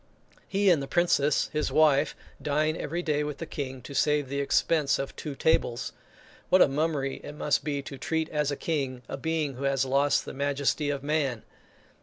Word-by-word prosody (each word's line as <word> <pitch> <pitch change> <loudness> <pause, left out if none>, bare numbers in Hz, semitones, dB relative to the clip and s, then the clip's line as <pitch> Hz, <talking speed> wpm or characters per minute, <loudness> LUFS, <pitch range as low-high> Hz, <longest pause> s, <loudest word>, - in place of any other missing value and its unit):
He 195 -1 +3
and 160 -5 +3
the 135 - -5
Princess 150 -4 +2
his 150 0 0
wife, 150 -2 +4 0.3
dine 155 +2 +1
every 170 +3 -3
day 150 -2 +1
with 150 -1 -4
the 165 - -5
King, 130 -5 -6
to 140 - -8
save 145 0 +2
the 140 +1 -2
expense 140 0 +2
of 135 - -5
two 150 -3 -6
tables. 120 -5 +1 0.6
What 185 - +6
a - - +4
mummery 140 -1 -1
it 145 - -7
must 150 -1 0
be 145 -2 -2
to 135 -2 -8
treat 160 -1 -1
as 150 -2 0
a 145 - -1
king 135 -5 -2
a - - -4
being 155 0 -1
who 135 - -6
has 135 -1 +2
lost 140 +2 +2
the - - -7
majesty 140 +1 0
of 140 -1 -2
man! 140 -6 0
145 Hz, 195 wpm, -28 LUFS, 135-155 Hz, 0.6 s, What